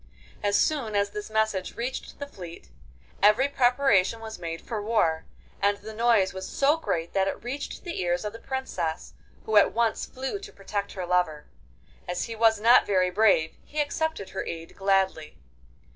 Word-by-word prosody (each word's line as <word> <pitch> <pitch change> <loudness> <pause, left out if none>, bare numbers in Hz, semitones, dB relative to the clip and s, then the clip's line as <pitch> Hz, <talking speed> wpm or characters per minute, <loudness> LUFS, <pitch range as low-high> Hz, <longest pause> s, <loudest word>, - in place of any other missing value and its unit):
As 205 0 +2
soon 255 -9 +1
as 200 0 +1
this 210 +1 -6
message 220 -3 0
reached 245 +3 -4
the 285 - -5
fleet, 175 -11 -11 0.5
every 210 +7 +5
preparation 245 -6 +3
was 220 -3 -8
made 165 -1 -4
for 220 -3 -5
war, 205 -7 +1 0.4
and 200 0 +3
the 215 +2 -9
noise 220 -4 +3
was 190 0 -6
so 280 +2 +3
great 170 - -3
that 195 -1 +2
it - - -4
reached 260 +4 -5
the 345 - -4
ears 175 +2 0
of 210 - -3
the 230 - -9
Princess, 260 -12 -4 0.3
who 220 -1 +2
at 205 - +6
once 230 -1 0
flew 265 +10 -4
to 400 - -10
protect 200 0 -4
her 185 -3 -4
lover. 175 -4 0 0.6
As 180 0 -2
he 230 - -5
was 220 -1 +4
not 235 +4 +6
very 185 -2 +2
brave 190 -5 +3
he 305 - -6
accepted 300 -6 -1
her - - -4
aid 165 0 -7
gladly. 195 -5 0
210 Hz, 175 wpm, -27 LUFS, 185-240 Hz, 0.6 s, at